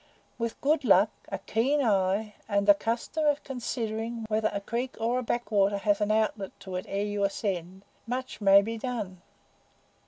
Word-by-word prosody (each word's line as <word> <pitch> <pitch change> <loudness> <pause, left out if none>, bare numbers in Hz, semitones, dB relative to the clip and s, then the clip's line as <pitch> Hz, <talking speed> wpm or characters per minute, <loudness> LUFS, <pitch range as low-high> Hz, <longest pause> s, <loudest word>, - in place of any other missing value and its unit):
With 230 -1 -3
good 295 +1 +2
luck, 210 -2 +5 0.2
a - - -2
keen 265 +7 +1
eye, 210 -3 +1 0.2
and 200 -1 +2
the 205 - +10
custom 230 +9 -2
of 290 0 +2
considering 230 -3 -3
whether 215 0 +1
a 200 - -2
creek 235 +5 -3
or 235 +3 +1
a - - -2
backwater 210 -4 +1
has 205 +1 +1
an 210 - +1
outlet 215 -2 0
to 190 -1 -6
it 180 - -6
ere 200 +1 -1
you 205 -1 -1
ascend, 190 -2 -2 0.2
much 255 -1 -4
may 200 0 +7
be 225 +2 -4
done." 215 -8 -4
215 Hz, 175 wpm, -28 LUFS, 200-235 Hz, 0.2 s, the